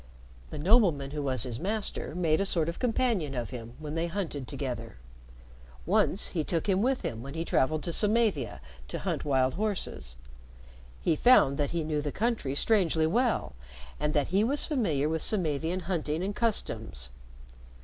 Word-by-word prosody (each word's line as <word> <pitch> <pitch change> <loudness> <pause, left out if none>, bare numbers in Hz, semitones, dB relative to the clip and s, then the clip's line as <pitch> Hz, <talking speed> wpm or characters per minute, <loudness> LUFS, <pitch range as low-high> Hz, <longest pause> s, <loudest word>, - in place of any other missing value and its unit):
The - - -6
nobleman 165 - +3
who 150 0 -3
was 130 -3 0
his 120 -3 -4
master 200 -3 -3
made 165 -1 +2
a - - +3
sort 165 -4 +1
of 170 - -4
companion 225 - 0
of 120 0 -3
him 120 -1 -8
when 150 -1 -6
they 165 +1 -1
hunted 165 -8 -4
together. 125 - -5 0.9
Once 195 - +2
he 165 -4 -1
took 165 +4 -1
him 195 -1 +2
with 260 +3 +1
him 115 -2 -3
when 140 +4 -8
he 165 +1 -2
traveled 155 +1 +1
to 170 - -2
Samavia 205 - +1 0.3
to - - -4
hunt - - -2
wild 130 -2 +2
horses. 200 - -3 0.9
He - - +3
found 150 - +5
that 145 - +1
he 170 -1 -1
knew 155 -1 -1
the 145 -1 -3
country 220 - -1
strangely 165 -4 +3
well, 235 +8 +1 0.5
and 150 +1 -1
that 145 -2 +1
he 195 +3 +3
was 280 +6 +1
familiar 170 - 0
with 160 0 -1
Samavian 170 -2 0
hunting 165 -2 -1
and 200 +2 -3
customs. 110 - 0
160 Hz, 170 wpm, -29 LUFS, 140-200 Hz, 0.9 s, found